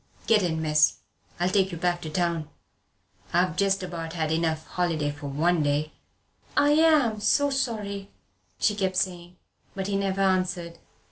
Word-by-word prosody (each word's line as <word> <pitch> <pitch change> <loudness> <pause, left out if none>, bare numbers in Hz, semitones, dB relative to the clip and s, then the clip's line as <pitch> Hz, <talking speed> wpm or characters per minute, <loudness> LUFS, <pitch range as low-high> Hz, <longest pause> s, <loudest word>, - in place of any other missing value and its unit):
Get 220 -2 +4
in, 160 -3 -1
miss. 150 0 +4 0.4
I'll 180 +1 +1
take 190 -1 +2
you 170 - -5
back 175 +1 0
to 160 - -5
the 155 - -10
town. 170 -3 0 0.8
I've 175 -2 +2
just 195 -1 +1
about 165 -2 -5
had 160 -3 -1
enough 160 -1 0
holiday 165 -5 -1
for 145 0 -8
one 160 +4 +1
day." 145 +1 0 0.7
"I 290 - +5
am 300 -8 +4
so 285 +7 +2
sorry," 210 -7 -3 0.5
she 210 - +2
kept 190 -2 -1
saying. 175 -1 -2 0.4
But 195 -1 -3
he 200 0 -1
never 195 0 0
answered. 180 -3 0
180 Hz, 160 wpm, -26 LUFS, 160-200 Hz, 0.8 s, I